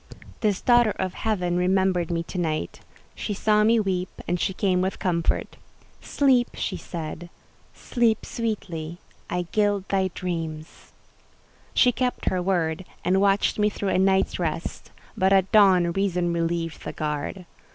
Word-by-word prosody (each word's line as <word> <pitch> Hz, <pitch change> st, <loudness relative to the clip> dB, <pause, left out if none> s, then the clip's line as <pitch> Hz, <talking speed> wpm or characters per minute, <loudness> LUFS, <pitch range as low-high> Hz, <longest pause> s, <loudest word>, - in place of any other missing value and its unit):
This 210 Hz, -4 st, 0 dB
daughter 240 Hz, -2 st, +5 dB
of 185 Hz, -1 st, -2 dB
Heaven 180 Hz, -6 st, -1 dB
remembered 185 Hz, -1 st, +1 dB
me 170 Hz, -1 st, -1 dB
to 180 Hz, -, -6 dB
night; 155 Hz, -, -2 dB, 0.3 s
she 205 Hz, -, -4 dB
saw 210 Hz, +1 st, +3 dB
me 225 Hz, +2 st, +4 dB
weep, 185 Hz, -3 st, -1 dB, 0.2 s
and 175 Hz, 0 st, 0 dB
she -, -, 0 dB
came 185 Hz, -1 st, +1 dB
with 190 Hz, +1 st, -1 dB
comfort: 170 Hz, -3 st, -1 dB, 0.4 s
"Sleep," 260 Hz, -4 st, +2 dB
she -, -, -3 dB
said. 165 Hz, 0 st, -6 dB, 0.5 s
"Sleep, 230 Hz, -3 st, 0 dB
sweetly—I 180 Hz, -5 st, -5 dB
gild 205 Hz, -2 st, +1 dB
thy 190 Hz, -1 st, +2 dB
dreams!" 165 Hz, -3 st, -5 dB, 0.8 s
She 250 Hz, -, +5 dB
kept 250 Hz, +1 st, -1 dB
her 185 Hz, -1 st, 0 dB
word, 175 Hz, -2 st, 0 dB, 0.2 s
and 190 Hz, +2 st, +3 dB
watched 200 Hz, +1 st, +2 dB
me 210 Hz, 0 st, +4 dB
through 200 Hz, -1 st, -3 dB
a 185 Hz, -, +2 dB
night's 190 Hz, 0 st, +2 dB
rest; 165 Hz, -1 st, -3 dB, 0.3 s
but 190 Hz, -3 st, +2 dB
at 195 Hz, -1 st, +3 dB
dawn 190 Hz, -5 st, +5 dB
Reason 180 Hz, -2 st, 0 dB
relieved 165 Hz, -1 st, -2 dB
the -, -, -5 dB
guard. 155 Hz, +4 st, -4 dB
185 Hz, 145 wpm, -25 LUFS, 170-205 Hz, 0.8 s, daughter